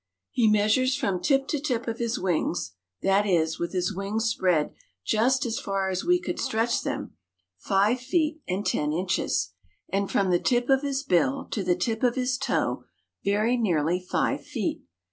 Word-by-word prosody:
He 230 -3 +3
measures 215 +5 +3
from 200 -10 -1
tip 275 -2 +2
to 300 - 0
tip 250 -5 -2
of 230 0 -3
his 235 0 -1
wings, 175 - -1 0.3
that 195 +2 +3
is, 160 -4 +1
with 170 - -2
his 185 +1 -1
wings 200 +4 -2
spread 180 -8 +1 0.3
just 255 - +2
as 230 -1 -2
far 195 -1 -1
as 185 - -2
we 355 +1 +3
could 350 - -4
stretch 235 -2 0
them, - - -4 0.5
five 205 - +2
feet 310 +3 0
and 195 +3 -2
ten 150 0 0
inches, 170 - 0 0.4
and 195 +1 -1
from 190 -2 +1
the 175 - +3
tip 245 +1 +1
of 270 0 +4
his 275 -1 -2
bill 270 - +1
to 205 - -1
the 180 -1 +2
tip 220 +5 -2
of 245 -2 +2
his 255 -1 0
toe - - -1 0.4
very 210 +5 +2
nearly 175 -6 +1
five 180 - -1
feet. - - -3
215 Hz, 180 wpm, -26 LUFS, 185-255 Hz, 0.5 s, of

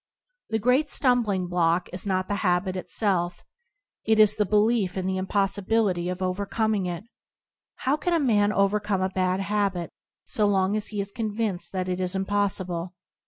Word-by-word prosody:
The 220 - +1
great 250 +7 +2
stumbling 235 -10 +2
block 175 0 +1
is 180 +2 -2
not 185 -1 0
the 205 - -1
habit 185 0 +1
itself, 180 -2 -1 0.6
it 220 0 +2
is 215 -2 +6
the 210 -2 0
belief 210 -2 +2
in 185 - -2
the 190 0 -1
impossibility 195 -1 0
of 180 +1 -3
overcoming 200 +2 -1
it. 175 +1 -4 0.7
How 275 +3 0
can 350 +3 -1
a - - +2
man 210 -7 +3
overcome 200 -1 +1
a 190 - +1
bad 185 0 0
habit 195 -4 -1 0.3
so 210 -1 +1
long 195 0 +2
as 215 -1 -2
he 210 - -4
is 200 0 -6
convinced 215 -4 -2
that 185 -1 -2
it 180 0 -2
is 185 0 -2
impossible? 190 -3 -2
195 Hz, 165 wpm, -25 LUFS, 185-210 Hz, 0.7 s, is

